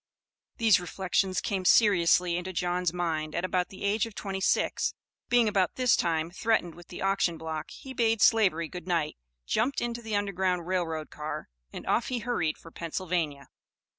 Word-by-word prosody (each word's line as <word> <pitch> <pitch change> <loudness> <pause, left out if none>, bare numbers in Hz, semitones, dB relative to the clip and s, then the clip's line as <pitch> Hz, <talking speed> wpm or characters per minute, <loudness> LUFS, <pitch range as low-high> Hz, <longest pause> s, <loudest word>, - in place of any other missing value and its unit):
These 220 -5 +5
reflections 185 +1 0
came 195 -2 -2
seriously 180 -4 +4
into 180 +2 -3
John's 180 0 0
mind 160 -3 -2
at 170 - 0
about 180 -1 0
the 190 - -10
age 205 +2 +1
of 220 - -12
twenty 195 -1 -4
six; - - +1 0.3
being 240 -2 +4
about 195 -4 +1
this 250 -2 +4
time 165 -1 0
threatened 185 -3 0
with 175 +1 -14
the 180 - -7
auction 195 -3 +1
block 160 -1 -5
he 265 - -9
bade 225 -3 +2
slavery 190 -8 +4
good 180 +1 -9
night, 165 -4 0 0.3
jumped 255 - +1
into 235 0 -3
the 220 -2 -3
Underground 190 -3 0
Rail 180 -1 0
Road 160 -1 -5
car 150 0 -6 0.2
and - - -8
off 235 - +1
he 255 - -1
hurried 225 -9 -1
for 165 - -14
Pennsylvania. 165 -4 -3
180 Hz, 175 wpm, -28 LUFS, 170-210 Hz, 0.3 s, These